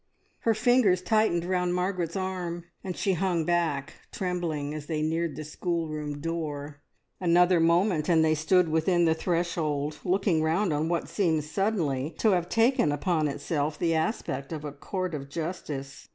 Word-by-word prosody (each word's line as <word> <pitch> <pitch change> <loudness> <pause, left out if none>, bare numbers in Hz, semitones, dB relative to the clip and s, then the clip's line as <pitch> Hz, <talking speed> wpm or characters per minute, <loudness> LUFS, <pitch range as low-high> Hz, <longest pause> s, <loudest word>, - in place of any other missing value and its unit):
Her 225 -1 +2
fingers 220 -6 +3
tightened 215 -5 +2
round 180 -1 0
Margaret's 180 -2 -1
arm, 180 -3 -3 0.2
and 185 -2 -5
she 195 - +1
hung 175 -2 0
back 160 -4 0 0.2
trembling 170 -6 -2
as 150 -1 -6
they 155 -2 -1
neared 160 -1 -1
the 155 - -5
schoolroom 155 -2 -3
door. 150 -3 -4 0.4
Another 175 0 +4
moment 170 0 +2
and 160 -2 +5
they 155 - +3
stood 165 +3 +3
within 170 +2 +2
the 160 - +4
threshold, 160 -4 -1
looking 185 -3 +2
round 165 +3 +1
on 155 +2 0
what 170 -1 -1
seemed 165 -7 +1
suddenly 155 -5 -1
to 220 - +3
have 175 -2 +1
taken 230 - +3
upon 155 +1 +1
itself 145 +1 -2
the 165 -1 +1
aspect 160 - -2
of 155 -2 -5
a 145 - -4
court 185 +5 -4
of 140 -2 -5
justice. 150 -4 -5
165 Hz, 160 wpm, -27 LUFS, 150-180 Hz, 0.4 s, and